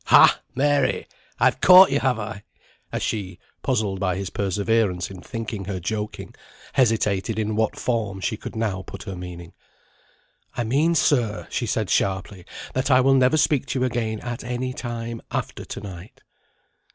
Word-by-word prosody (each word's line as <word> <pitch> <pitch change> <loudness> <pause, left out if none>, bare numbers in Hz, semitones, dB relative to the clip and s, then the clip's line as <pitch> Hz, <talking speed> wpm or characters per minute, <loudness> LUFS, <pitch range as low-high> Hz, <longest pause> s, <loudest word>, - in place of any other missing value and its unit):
Ha, - - +7
Mary! 145 +1 +2 0.3
I've - - +3
caught 185 -2 +9
you, 140 - +2
have 130 -3 +1
I?" 110 -1 -6 0.5
as - - -2
she, 95 -5 -3 0.2
puzzled 110 -7 0
by 95 -2 0
his 95 -1 -4
perseverance 100 -1 0
in 95 -2 -9
thinking 110 -4 -5
her 95 -1 -3
joking, 105 +4 -4 0.4
hesitated 110 -4 +1
in 110 -1 -1
what 110 0 0
form 110 -5 -1
she 110 +4 -1
could - - -8
now 105 -4 -1
put - - -9
her 95 - -6
meaning. 90 -1 -8 1.0
"I 120 - +1
mean, 145 +9 +2
sir," 120 -7 +2
she 120 - -1
said, 110 -2 -1
sharply, 95 -1 -1 0.3
"that 130 +2 0
I 130 -2 +6
will 135 +1 +4
never 130 +3 +4
speak 145 -3 +2
to 130 - -1
you - - +3
again 110 -3 -2
at 120 -1 -5
any 125 +1 -3
time, 115 -2 -5
after - - -4
to - - -6
night." 95 -1 -10
110 Hz, 165 wpm, -23 LUFS, 100-125 Hz, 1.0 s, caught